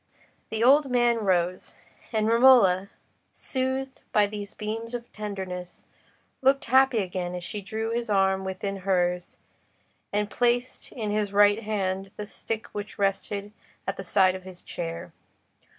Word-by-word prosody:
The 220 +1 -1
old 275 +3 +6
man 240 -1 +3
rose, 185 -4 0 0.4
and 215 -2 +1
Romola, 230 -6 +6 0.4
soothed 265 0 -3
by 210 -1 +4
these 205 0 -7
beams 225 +2 -4
of 240 0 -8
tenderness, 190 -4 -6 0.6
looked 270 +1 +3
happy 265 0 +4
again 180 -1 -4
as 180 - -5
she 205 +4 -5
drew 220 +3 -3
his 235 0 -2
arm 190 -1 +2
within 190 +1 -3
hers, 180 -2 0 0.7
and 205 0 0
placed 245 +3 0
in 215 -4 -3
his 210 -1 -1
right 205 +1 +5
hand 195 -3 -2
the 210 - -4
stick 220 +1 -5
which 205 +1 -7
rested 200 +1 -1 0.3
at - - -2
the 195 - -6
side 190 0 +4
of 190 - -6
his 185 -1 -12
chair. 170 -1 -6
205 Hz, 145 wpm, -26 LUFS, 190-230 Hz, 0.7 s, old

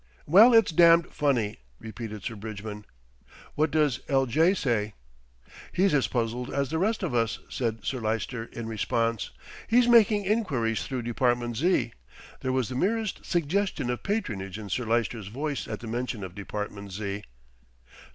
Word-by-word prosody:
"Well, 205 +11 +8
it's 225 -6 +5
damned 170 0 +5
funny," 120 -8 0 0.2
repeated 110 -2 -7
Sir 120 - -3
Bridgman. 105 0 -7 0.7
"What 155 +2 +1
does 150 -5 +2
L. 135 -2 +3
J. 160 - +3
say?" 110 - -1 0.8
"He's 190 0 +2
as 135 -3 +3
puzzled 120 0 -2
as 140 -1 -1
the 160 - 0
rest 215 +3 0
of 170 - -2
us," 115 -1 +1
said 115 -3 -3
Sir 130 - -2
Lyster 115 +1 -2
in 115 0 -7
response. 115 0 -1 0.4
"He's 240 +1 +4
making 215 -4 +5
enquiries 140 - 0
through 130 -3 -3
Department 120 0 0
Z." 175 +8 +1 0.5
There 130 - -2
was 130 -3 0
the - - -5
merest 215 - -1
suggestion 175 -5 0
of 125 - -4
patronage 105 - -3
in 105 -2 -8
Sir 120 +5 -1
Lyster's 115 -2 -1
voice 140 +5 -3
at 105 0 -5
the 120 - -7
mention 120 -2 -3
of 90 -2 -7
Department 100 0 -6
Z. 100 +1 -4
120 Hz, 160 wpm, -27 LUFS, 110-160 Hz, 0.8 s, Well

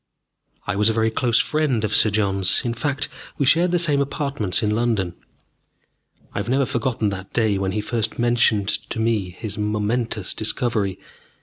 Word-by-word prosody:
I - - -2
was 105 +2 +3
a - - +1
very 110 0 +1
close 115 0 +2
friend 135 -3 +1
of 105 - 0
Sir 110 - +5
John's. 100 -1 +1
In 120 - 0
fact, 140 +3 -1 0.3
we 140 - +1
shared 165 +6 +4
the 175 - +2
same 150 -5 +3
apartments 140 - -1
in 105 - +1
London. 110 -6 0 1.2
I - - -2
have 100 - -4
never 135 +2 +2
forgotten 115 -3 -1
that 95 0 -7
day 110 -4 +1
when 95 -1 -1
he 105 - -1
first 110 0 -1
mentioned 120 -4 +2 0.2
to - - -3
me 110 -4 0
his 105 +4 -6
momentous 105 0 -1
discovery. 110 -4 0
110 Hz, 175 wpm, -22 LUFS, 105-125 Hz, 1.2 s, Sir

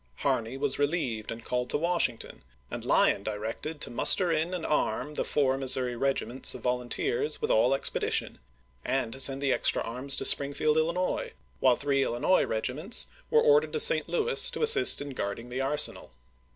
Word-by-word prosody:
Harney 115 - -2
was 140 0 -1
relieved 140 -8 -2
and 115 0 -9
called 125 0 -3
to - - 0
Washington, 170 -7 -2 0.3
and - - -6
Lyon - - +2
directed 110 +9 -6
to - - -3
muster 175 +9 +4
in 160 +2 -1
and 180 -3 -5
arm 150 0 -2
the - - -3
four 135 -2 -1
Mis 130 -1 +2
souri 125 -2 -3
regiments 135 0 -2
of - - -11
volunteers 130 - -2
with 450 +1 -2
all - - +2
expedition, 445 +1 -3 0.4
and 130 -4 -3
to 135 - -8
send 135 +1 +3
the 135 - +1
extra - - +2
arms 125 +4 0
to - - +2
Springfield, 145 +2 +4
Illinois, 170 +3 -2 0.3
while 130 -2 +3
three 140 0 -1
Illinois 125 +11 0
regiments 130 - -1 0.2
were 460 0 +3
ordered 460 -1 +2
to - - -2
St. - - +3
Louis 470 +1 +3
to - - -3
assist 405 - +5
in 145 - -9
guarding 115 0 -6
the 130 +2 -4
arsenal. 140 +2 +1
140 Hz, 180 wpm, -27 LUFS, 125-180 Hz, 0.4 s, assist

